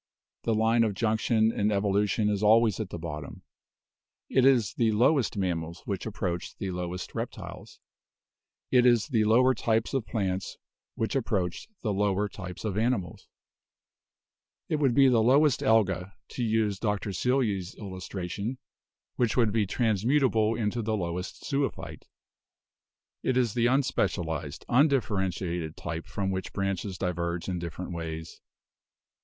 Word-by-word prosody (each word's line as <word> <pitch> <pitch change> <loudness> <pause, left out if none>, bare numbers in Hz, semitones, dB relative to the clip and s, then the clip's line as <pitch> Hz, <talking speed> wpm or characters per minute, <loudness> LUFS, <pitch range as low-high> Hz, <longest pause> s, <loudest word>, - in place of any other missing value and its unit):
The 115 - +2
line 115 +2 +3
of 105 -3 0
junction 110 0 +2
in 105 -1 0
evolution 105 +1 +1
is 105 -1 0
always 110 -1 +4
at 110 -4 -3
the - - -5
bottom. 75 -3 -7 0.9
It 130 - +3
is 120 -7 +3
the 115 -2 +2
lowest 125 +1 +2
mammals 85 -3 -2
which 100 +1 -3
approach 90 -5 -4
the 95 - -3
lowest 90 0 -5
reptiles; - - -7 0.9
it 125 -1 +5
is 120 0 +3
the 110 -5 +2
lower 125 +4 +5
types 115 -1 0
of 135 -5 -1
plants 95 -4 -2 0.4
which 110 - -2
approach 95 -9 -1 0.2
the 105 -3 0
lower 100 0 +1
types 95 -1 -8
of 105 -1 -1
animals; 115 -6 -1 1.4
it 155 - +1
would 135 -5 +2
be 135 -1 +7
the 120 -3 +4
lowest 135 +3 +4
Alga, 95 -4 +2
to 125 - -4
use 110 -3 +1
Dr. 105 -2 -1
Seelye's 105 -5 0
illustration, 100 +3 -5 0.6
which 120 -2 +1
would 115 -4 +4
be 105 -2 +1
transmutable 115 +1 +2
into 110 +1 -1
the 110 0 -1
lowest 90 -1 -4
zoophyte; 140 0 -3 1.2
it 130 - 0
is 120 -5 +2
the 120 -1 +2
unspecial 125 - +1
ized, 75 -2 -7
undifferentiated 95 - +1
type 85 -1 -5
from 95 -1 -2
which 95 -1 -4
branches 100 -1 -2
diverge 85 -1 -2
in 90 -2 -2
different 85 +2 -6
ways. 80 -1 -6
105 Hz, 140 wpm, -28 LUFS, 90-115 Hz, 1.4 s, be